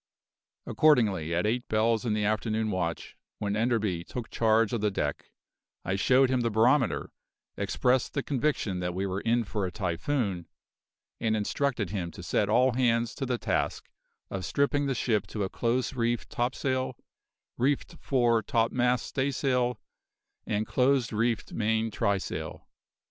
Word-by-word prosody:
Accordingly, 105 - +3
at 90 - +1
eight 120 +3 0
bells 110 +2 +1
in 105 - +1
the 105 -1 0
afternoon 110 +1 0
watch, 85 -3 -3 0.2
when 100 -1 -2
Enderby 110 -6 0
took 120 +5 -7
charge 110 -1 +2
of 115 - -1
the 105 - +2
deck, 100 - -3 0.6
I 95 - 0
showed 130 +6 +4
him 130 -1 +2
the 115 - +1
barometer, 120 +4 +2 0.4
expressed 125 0 0
the 140 - 0
conviction 130 -9 -1
that 90 0 -3
we 95 +1 -1
were 95 +1 -2
in 115 +1 +2
for 105 -1 -3
a 90 - -2
typhoon, 95 - -2 0.7
and 110 -1 +1
instructed 110 -2 -1
him 90 -5 -3
to 90 - -9
set 100 +3 0
all 125 +4 +4
hands 115 -2 +1
to 135 - -4
the 125 -1 0
task - - -2 0.4
of 95 -1 -3
stripping 140 +9 +1
the 135 - 0
ship 110 -2 0
to 105 - -3
a 95 - -2
close 120 +5 -1
reefed 120 -2 -1
topsail, 130 +1 -1 0.6
reefed 135 +3 0
fore 120 -4 +2
topmast 125 -1 +1
staysail, 130 -3 0 0.7
and 105 +1 0
close 130 -1 +2
reefed 115 +1 0
main 110 0 0
trysail. 100 -2 -2
115 Hz, 150 wpm, -28 LUFS, 105-125 Hz, 0.7 s, showed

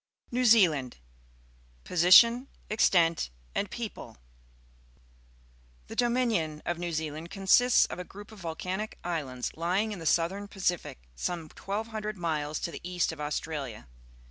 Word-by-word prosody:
NEW 250 +1 +1
ZEALAND 165 - +4 0.9
Position, 230 +9 +6 0.2
Extent, 170 - +3 0.2
and - - -1
People. - - -7 0.8
— - - -31
The - - -7
Do2aijxion_of 230 -11 0
N^eiv 175 0 -2
Zealand 155 +1 -4
consists 200 +6 +4
of - - -7
a - - -3
group 205 +4 -12
of 215 - -12
volcanic 185 +5 -4
islands, 145 -8 -3
Ijdng 185 +7 0
in 200 - -5
the 165 - -4
Southern 185 +6 +1
Pacific 175 - -2
some 170 - -3
1,200 215 +1 -4
miles 155 -3 -2
to 170 - -3
the - - -8
east 180 -1 0
of 160 -2 -8
Australia. 145 - -4
175 Hz, 130 wpm, -29 LUFS, 150-205 Hz, 0.9 s, Position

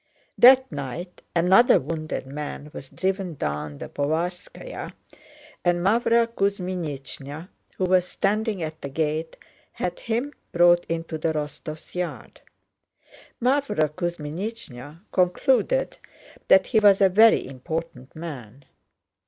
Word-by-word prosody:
That 260 +1 +7
night 145 +5 -6
another 190 +8 +5
wounded 155 -1 -4
man 145 +1 -7
was 135 - -9
driven 190 -3 -2
down 75 - -4
the - - -7
Povarskáya, 175 - -4 0.7
and 175 0 +1
Mávra 230 +2 +3
Kuzmínichna, 180 - -4 0.3
who 185 - +1
was 180 0 +3
standing 210 -2 -1
at 155 0 -6
the 140 - -5
gate, 155 +2 -2 0.4
had 180 -1 -3
him 240 +6 -2 0.2
brought 175 0 +5
into 165 -1 -4
the 160 +1 0
Rostóvs' 155 +1 -6
yard. 180 -1 -5 1.0
Mávra 255 - +1
Kuzmínichna 165 - -6
concluded 260 - +1 0.5
that 190 0 +6
he 220 - +3
was 205 -2 +6
a 195 - +6
very 220 +4 +5
important 135 0 -6
man. 140 -6 -8
175 Hz, 110 wpm, -24 LUFS, 150-195 Hz, 1.0 s, That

